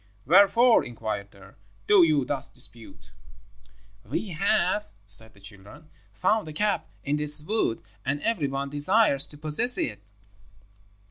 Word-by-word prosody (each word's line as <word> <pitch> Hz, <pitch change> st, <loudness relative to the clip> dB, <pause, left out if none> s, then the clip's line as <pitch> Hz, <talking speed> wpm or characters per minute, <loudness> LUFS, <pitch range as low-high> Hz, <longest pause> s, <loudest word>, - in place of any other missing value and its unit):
'Wherefore,' 200 Hz, -, +4 dB
inquired 110 Hz, -4 st, -6 dB
they, 100 Hz, -1 st, -17 dB, 0.4 s
'do 205 Hz, -2 st, +5 dB
you 155 Hz, -5 st, +2 dB
thus 140 Hz, 0 st, -3 dB
dispute?' 120 Hz, -3 st, -6 dB, 0.9 s
"'We 145 Hz, -, -5 dB
have,' 195 Hz, +3 st, -1 dB, 0.2 s
said 110 Hz, +1 st, +1 dB
the -, -, -20 dB
children, 100 Hz, -, -16 dB, 0.2 s
'found 205 Hz, -, -1 dB
a 155 Hz, -, -8 dB
cap 210 Hz, +6 st, -2 dB
in 145 Hz, +1 st, -1 dB
this 150 Hz, 0 st, +6 dB
wood, 160 Hz, -, -2 dB, 0.2 s
and 140 Hz, +3 st, -2 dB
every 205 Hz, -11 st, -1 dB
one 135 Hz, 0 st, -5 dB
desires 145 Hz, 0 st, +2 dB
to 145 Hz, -, -14 dB
possess 155 Hz, +12 st, 0 dB
it.' 105 Hz, -2 st, -3 dB
150 Hz, 135 wpm, -25 LUFS, 120-195 Hz, 0.9 s, this